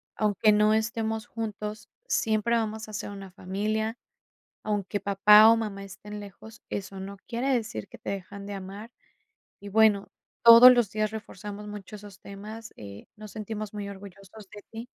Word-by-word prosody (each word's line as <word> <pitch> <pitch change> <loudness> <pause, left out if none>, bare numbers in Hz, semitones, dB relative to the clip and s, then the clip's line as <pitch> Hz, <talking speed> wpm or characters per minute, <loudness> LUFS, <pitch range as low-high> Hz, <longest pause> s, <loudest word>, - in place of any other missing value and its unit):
aunque 210 0 +3
no 210 +1 +4
estemos 220 +1 -1
juntos, 215 -1 -6 0.2
siempre 220 +1 +1
vamos 220 -1 -2
a - - -10
ser 205 - -5
una 195 -1 -9
familia, 215 +4 -2 0.7
aunque 205 -1 -2
papá 210 +2 +7
o 230 - +6
mamá 210 -3 -4
estén 210 +2 -9
lejos, 205 +2 -12
eso 195 -1 -5
no 200 +1 -7
quiere 255 +3 -1
decir 215 - -3
que - - -13
te - - -7
dejan 200 +1 -6
de 205 - -6
amar". 200 +4 -8 0.7
Y, 200 - -9
bueno, 210 -1 +3 0.4
todos 235 +2 +11
los 240 -5 +2
días 215 0 -1
reforzamos 210 -1 -8
mucho 205 0 -9
esos 205 -2 -11
temas, 215 +3 -9
eh: 100 -1 -11
"Nos 215 -1 -10
sentimos 215 -1 -6
muy 205 -1 -5
orgullosos 200 +1 -12
de 205 -1 -10
ti". 225 +2 -7
210 Hz, 165 wpm, -27 LUFS, 200-220 Hz, 0.7 s, todos